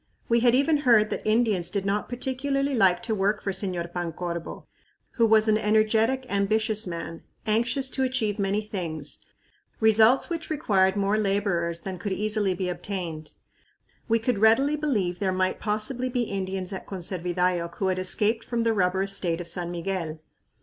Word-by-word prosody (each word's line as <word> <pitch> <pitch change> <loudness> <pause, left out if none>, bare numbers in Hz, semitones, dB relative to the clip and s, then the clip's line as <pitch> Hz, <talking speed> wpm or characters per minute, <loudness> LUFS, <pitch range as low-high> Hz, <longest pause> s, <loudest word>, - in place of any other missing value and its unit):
We 235 0 +3
had 240 +1 +4
even 295 +4 +3
heard 230 -7 +4
that - - -2
Indians 215 -5 +2
did 200 -2 -2
not 200 +1 -1
particularly 275 +3 -1
like 190 -6 +3
to 230 -1 -1
work 205 +1 +1
for 195 - -3
Señor 180 -3 -2
Pancorbo, 170 -1 -5 0.5
who 230 -2 +2
was 220 0 +4
an 215 0 +3
energetic, 220 +4 +2
ambitious 215 +1 +1
man, 170 -1 -6 0.2
anxious 240 +5 +1
to 265 - -2
achieve 250 -6 0
many 200 +1 0
things, 165 -8 -5 0.6
results 220 +3 +5
which 335 -2 -5
required 200 -11 +2
more 200 +1 +1
laborers 195 -5 0
than 190 -2 -6
could 205 -3 -3
easily 210 -1 +1
be 185 0 -3
obtained. 175 -4 -5 0.7
We 230 -1 +3
could 230 -1 -1
readily 240 +7 +4
believe 210 -13 -1
there 195 -2 0
might 185 0 0
possibly 220 +5 -1
be 245 -1 0
Indians 190 -2 -4
at 190 - -7
Conservidayoc 180 -1 -2
who 190 - -1
had 185 0 -1
escaped 210 +4 +1
from 235 -1 -2
the 230 -1 +2
rubber 190 -1 +1
estate 190 -4 -1
of 175 - -6
San 175 0 -2
Miguel. 175 -2 -3
205 Hz, 165 wpm, -26 LUFS, 185-230 Hz, 0.7 s, results